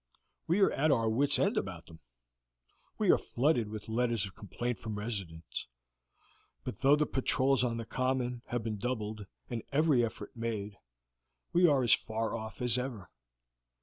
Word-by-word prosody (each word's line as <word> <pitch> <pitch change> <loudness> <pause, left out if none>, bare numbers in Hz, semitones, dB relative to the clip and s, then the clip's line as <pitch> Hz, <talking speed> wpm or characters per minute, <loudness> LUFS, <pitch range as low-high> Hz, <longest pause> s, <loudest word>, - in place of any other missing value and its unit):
We 175 +5 +3
are - - +5
at 155 +3 +2
our 115 -6 +3
wits' 130 +6 +3
end - - +2
about - - -3
them. 80 -1 -14 1.0
We - - +4
are - - +4
flooded 125 -4 +1
with 105 -1 -7
letters 115 -2 +1
of 95 - -9
complaint 120 +2 -4
from 110 -2 -5
residents; 95 -7 -4 1.0
but - - -5
though 140 +2 +6
the 150 0 +2
patrols 135 -1 +2
on 115 -2 0
the 115 - -4
common 130 -1 -1
have 120 -2 -2
been 110 -2 -3
doubled 110 -3 -3 0.2
and 120 -2 -3
every 145 -3 +4
effort 115 - -5
made, 105 -3 -4 0.7
we 175 +1 +6
are 140 -4 +4
as 120 - +6
far 110 +1 -1
off 110 +1 -6
as 125 0 +2
ever. 125 -6 -5
120 Hz, 165 wpm, -32 LUFS, 110-130 Hz, 1.0 s, though